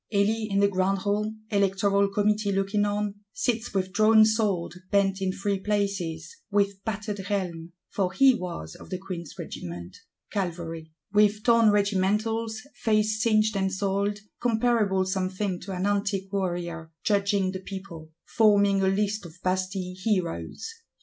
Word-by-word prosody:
Elie, 215 Hz, +2 st, +1 dB
in 200 Hz, 0 st, +2 dB
the 200 Hz, -, +5 dB
grand 195 Hz, 0 st, +1 dB
Hall, 205 Hz, +2 st, -1 dB, 0.2 s
Electoral 200 Hz, 0 st, +2 dB
Committee 210 Hz, +1 st, +1 dB
looking 195 Hz, +2 st, +1 dB
on, 205 Hz, 0 st, -2 dB
sits 240 Hz, -1 st, -1 dB
"with 190 Hz, -2 st, -1 dB
drawn 215 Hz, +1 st, +6 dB
sword 215 Hz, -5 st, 0 dB, 0.2 s
bent 195 Hz, -1 st, +2 dB
in 190 Hz, -1 st, +1 dB
three 195 Hz, +1 st, -1 dB
places;" 190 Hz, -6 st, -2 dB
with 200 Hz, -1 st, +1 dB
battered 210 Hz, -1 st, -3 dB
helm, 180 Hz, -4 st, -3 dB
for 190 Hz, -2 st, -1 dB
he 270 Hz, +4 st, +6 dB
was 175 Hz, -, -5 dB
of -, -, -13 dB
the 185 Hz, -, -3 dB
Queen's 180 Hz, -4 st, -7 dB
Regiment, 85 Hz, +1 st, -7 dB, 0.4 s
Cavalry; 165 Hz, -4 st, -4 dB, 0.2 s
with 210 Hz, 0 st, +4 dB
torn 230 Hz, -2 st, +5 dB
regimentals, 210 Hz, +3 st, +1 dB
face 215 Hz, 0 st, +1 dB
singed 215 Hz, -3 st, +3 dB
and 190 Hz, -1 st, 0 dB
soiled; 200 Hz, +1 st, 0 dB, 0.2 s
comparable, 225 Hz, -5 st, +2 dB
some 190 Hz, 0 st, -1 dB
think, 185 Hz, -1 st, -3 dB
to 195 Hz, -, -6 dB
"an 185 Hz, 0 st, -2 dB
antique 200 Hz, -1 st, -1 dB
warrior;"—judging 185 Hz, +2 st, -1 dB
the 185 Hz, -, -5 dB
people; 185 Hz, -4 st, -8 dB, 0.2 s
forming 200 Hz, -3 st, +4 dB
a 190 Hz, -, +2 dB
list 205 Hz, +2 st, 0 dB
of 160 Hz, -, -15 dB
Bastille 185 Hz, 0 st, -1 dB
Heroes. 180 Hz, -, -1 dB
200 Hz, 145 wpm, -26 LUFS, 185-210 Hz, 0.4 s, drawn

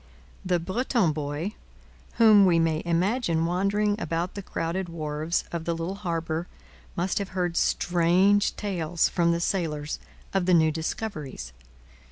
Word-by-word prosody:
The 180 Hz, -2 st, +1 dB
Breton 195 Hz, -, +1 dB
boy, 150 Hz, +6 st, -3 dB, 0.6 s
whom 215 Hz, -3 st, +7 dB
we 170 Hz, -2 st, +4 dB
may 165 Hz, -1 st, +1 dB
imagine 170 Hz, 0 st, +1 dB
wandering 205 Hz, +4 st, 0 dB
about 170 Hz, +3 st, -2 dB
the 200 Hz, -, -5 dB
crowded 175 Hz, 0 st, -3 dB
wharves 155 Hz, 0 st, -2 dB
of 170 Hz, -1 st, -4 dB
the 170 Hz, -, 0 dB
little 165 Hz, +3 st, -3 dB
harbour, 170 Hz, -3 st, -3 dB, 0.5 s
must 175 Hz, +3 st, 0 dB
have 200 Hz, -1 st, -4 dB
heard 175 Hz, -2 st, 0 dB
strange 180 Hz, +5 st, +3 dB
tales 175 Hz, -5 st, 0 dB
from 170 Hz, -1 st, +2 dB
the 170 Hz, -, 0 dB
sailors 155 Hz, -5 st, -2 dB, 0.3 s
of 190 Hz, -2 st, +1 dB
the 180 Hz, -, +5 dB
new 160 Hz, -1 st, +4 dB
discoveries. 155 Hz, -, -5 dB
170 Hz, 140 wpm, -26 LUFS, 165-195 Hz, 0.6 s, whom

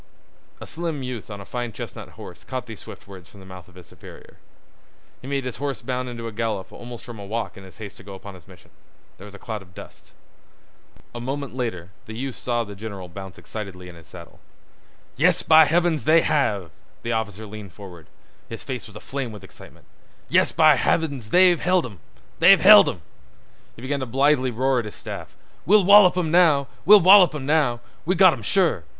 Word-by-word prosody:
A -, -, -9 dB
slim 160 Hz, -4 st, -5 dB
youth 125 Hz, -4 st, -7 dB
on 100 Hz, -1 st, -8 dB
a 100 Hz, -, -10 dB
fine 120 Hz, +1 st, -5 dB
chestnut -, -, -9 dB
horse -, -, -11 dB
caught 130 Hz, -1 st, -6 dB
these 115 Hz, -4 st, -10 dB
swift -, -, -13 dB
words 95 Hz, -3 st, -13 dB
from 100 Hz, -, -17 dB
the 95 Hz, -, -14 dB
mouth 95 Hz, -2 st, -12 dB
of 90 Hz, -, -21 dB
his 90 Hz, -2 st, -14 dB
superior. -, -, -15 dB, 0.8 s
He 130 Hz, -, -10 dB
made 140 Hz, -1 st, -2 dB
his 125 Hz, -, -5 dB
horse 140 Hz, 0 st, -4 dB
bound 125 Hz, -1 st, -3 dB
into 115 Hz, -1 st, -7 dB
a -, -, -6 dB
gallop 110 Hz, -3 st, -4 dB
almost 120 Hz, -1 st, -10 dB
from 120 Hz, -4 st, -10 dB
a -, -, -8 dB
walk 110 Hz, +3 st, -4 dB
in 95 Hz, -, -12 dB
his 95 Hz, -, -15 dB
haste 105 Hz, -3 st, -10 dB
to -, -, -14 dB
go 100 Hz, 0 st, -10 dB
upon 100 Hz, +1 st, -11 dB
his 90 Hz, -3 st, -16 dB
mission. 90 Hz, -2 st, -18 dB, 0.5 s
There 95 Hz, -, -11 dB
was 100 Hz, -1 st, -12 dB
a -, -, -10 dB
cloud 110 Hz, -1 st, -6 dB
of 90 Hz, -1 st, -19 dB
dust. -, -, -13 dB, 1.0 s
A 120 Hz, -, -7 dB
moment 135 Hz, 0 st, -5 dB
later 95 Hz, -9 st, -5 dB, 0.2 s
the 110 Hz, -, -8 dB
youth 135 Hz, 0 st, -5 dB
saw 120 Hz, -1 st, -2 dB
the 105 Hz, -2 st, -10 dB
general 100 Hz, -3 st, -8 dB
bounce 95 Hz, +1 st, -10 dB
excitedly 95 Hz, -4 st, -9 dB
in -, -, -12 dB
his 85 Hz, -2 st, -16 dB
saddle. -, -, -13 dB, 0.8 s
"Yes, -, -, +2 dB
by 160 Hz, 0 st, +7 dB
heavens, 165 Hz, 0 st, 0 dB
they 160 Hz, +2 st, +5 dB
have!" 100 Hz, -, -1 dB, 0.3 s
The 115 Hz, -, -3 dB
officer 110 Hz, -2 st, -3 dB
leaned 105 Hz, -3 st, -10 dB
forward. 90 Hz, -6 st, -12 dB, 0.4 s
His 115 Hz, -, -8 dB
face 130 Hz, -3 st, -6 dB
was 105 Hz, -, -16 dB
aflame 130 Hz, +3 st, -6 dB
with 105 Hz, -2 st, -11 dB
excitement. 95 Hz, -, -16 dB, 0.4 s
"Yes, -, -, +3 dB
by -, -, +5 dB
heavens, 140 Hz, -9 st, -1 dB
they've 180 Hz, +2 st, +4 dB
held 180 Hz, 0 st, +1 dB
'im! 100 Hz, -8 st, -10 dB, 0.4 s
They've 180 Hz, +3 st, +7 dB
held 210 Hz, +5 st, +8 dB
'im!" 85 Hz, -, -8 dB, 0.7 s
He 115 Hz, -, -13 dB
began 140 Hz, +2 st, -2 dB
to 130 Hz, -, -4 dB
blithely 135 Hz, +1 st, +2 dB
roar 130 Hz, +2 st, 0 dB
at 115 Hz, -, -4 dB
his 105 Hz, -, -8 dB
staff: -, -, -9 dB, 0.3 s
"We'll 205 Hz, 0 st, +5 dB
wallop 200 Hz, -2 st, +7 dB
'im 165 Hz, -4 st, -1 dB
now. 160 Hz, -5 st, +4 dB, 0.2 s
We'll 210 Hz, 0 st, +8 dB
wallop 185 Hz, -2 st, +7 dB
'im 140 Hz, -3 st, -5 dB
now. 140 Hz, -6 st, +1 dB, 0.2 s
We've 185 Hz, +2 st, -1 dB
got 185 Hz, -2 st, +6 dB
'em -, -, -7 dB
sure." 175 Hz, -, +1 dB
120 Hz, 210 wpm, -23 LUFS, 100-150 Hz, 1.0 s, held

